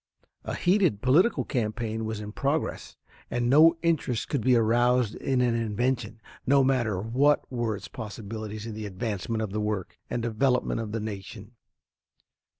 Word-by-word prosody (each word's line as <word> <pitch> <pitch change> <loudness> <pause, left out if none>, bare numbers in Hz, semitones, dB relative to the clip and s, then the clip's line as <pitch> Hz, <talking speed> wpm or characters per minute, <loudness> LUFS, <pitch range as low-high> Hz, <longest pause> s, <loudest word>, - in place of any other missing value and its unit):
A - - -4
heated 180 - +2
political 165 - +3
campaign 110 -2 -2
was 110 -1 -4
in 105 0 -6
progress, 140 +7 -2 0.3
and 120 0 -1
no 160 +4 +7
interest 150 -8 0
could 140 - 0
be 125 +2 +4
aroused 120 0 +3
in 130 -2 0
an 120 -2 +2
invention, 115 0 -1 0.3
no 140 +1 +5
matter 120 -7 +1
what 130 +8 +2
were 120 -3 -1
its 100 - -9
possibilities 110 -1 -7
in 115 - -5
the 105 0 -5
advancement 110 +2 -3
of 105 - -4
the 105 +1 -2
work 105 -3 -3
and 120 - -2
development 125 +2 +1
of 110 -2 -5
the 115 - -2
nation. 105 0 -7
115 Hz, 155 wpm, -27 LUFS, 110-130 Hz, 0.3 s, no